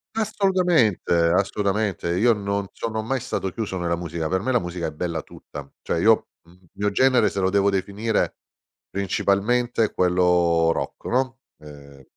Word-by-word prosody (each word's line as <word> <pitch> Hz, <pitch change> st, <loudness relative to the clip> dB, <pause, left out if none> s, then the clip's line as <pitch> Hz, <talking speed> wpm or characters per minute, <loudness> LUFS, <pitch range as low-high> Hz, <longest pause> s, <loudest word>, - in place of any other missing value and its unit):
Assolutamente 185 Hz, -, +2 dB
assolutamente. 95 Hz, +3 st, +1 dB
Io 120 Hz, +3 st, +4 dB
non 100 Hz, -1 st, -2 dB
sono 110 Hz, -1 st, -3 dB
mai 130 Hz, +3 st, -1 dB
stato 95 Hz, -6 st, -3 dB
chiuso 105 Hz, -3 st, -4 dB
nella 85 Hz, -1 st, -1 dB
musica, 85 Hz, -2 st, -4 dB
per 95 Hz, +2 st, 0 dB
me 130 Hz, -, -1 dB
la 125 Hz, -, +3 dB
musica 85 Hz, -1 st, -4 dB
è -, -, -5 dB
bella 80 Hz, 0 st, -3 dB
tutta. 70 Hz, -1 st, -11 dB
Cioè -, -, -2 dB
io, -, -, +3 dB, 0.2 s
il 90 Hz, +2 st, -20 dB
mio 105 Hz, +1 st, -1 dB
genere 130 Hz, +2 st, +3 dB
se 100 Hz, -, -4 dB
lo 95 Hz, 0 st, +2 dB
devo 100 Hz, 0 st, +3 dB
definire 100 Hz, +3 st, -1 dB, 0.5 s
principalmente 105 Hz, +5 st, 0 dB
è -, -, -6 dB
quello 90 Hz, -2 st, +3 dB
rock, -, -, -4 dB
no, 130 Hz, +1 st, -1 dB, 0.2 s
ehm, 70 Hz, -2 st, -14 dB
100 Hz, 160 wpm, -23 LUFS, 85-115 Hz, 0.5 s, Io